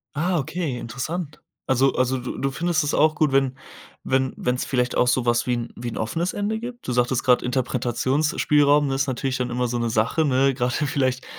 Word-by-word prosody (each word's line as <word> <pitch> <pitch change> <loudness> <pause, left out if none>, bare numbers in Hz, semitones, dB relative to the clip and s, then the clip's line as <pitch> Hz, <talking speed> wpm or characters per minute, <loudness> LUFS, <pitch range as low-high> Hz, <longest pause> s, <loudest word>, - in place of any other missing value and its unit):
Ah, 175 +4 +1
okay, 155 -1 -3
interessant. 150 +7 -5 0.3
Also 130 +1 +3
also, 130 +1 +1
du 125 0 -6
du 135 - -1
findest 165 +3 0
es 145 - -1
auch 155 +1 +4
gut, 155 -1 +2
wenn 135 -1 +1 0.5
wenn 130 0 0
wenn's 125 +1 -1
vielleicht 125 -2 -1
auch 125 - +3
so 125 0 +2
was 120 0 +1
wie 125 - +1
'n 120 -1 -3
wie 120 - -7
'n 115 - -6
offenes 165 +11 -2
Ende 205 +2 -2
gibt. 240 - -8
Du - - 0
sagtest 125 0 +1
grad 125 -1 +3
Interpretationsspielraum 140 +4 +1
ist 135 +1 0
natürlich 130 0 -2
dann 125 -1 -2
immer 125 0 -1
so 120 0 -2
'ne 120 0 0
Sache, 115 +8 +1
ne? 135 -1 +3
Grade 125 -1 -1
vielleicht, 130 -2 0
130 Hz, 205 wpm, -23 LUFS, 125-150 Hz, 0.5 s, auch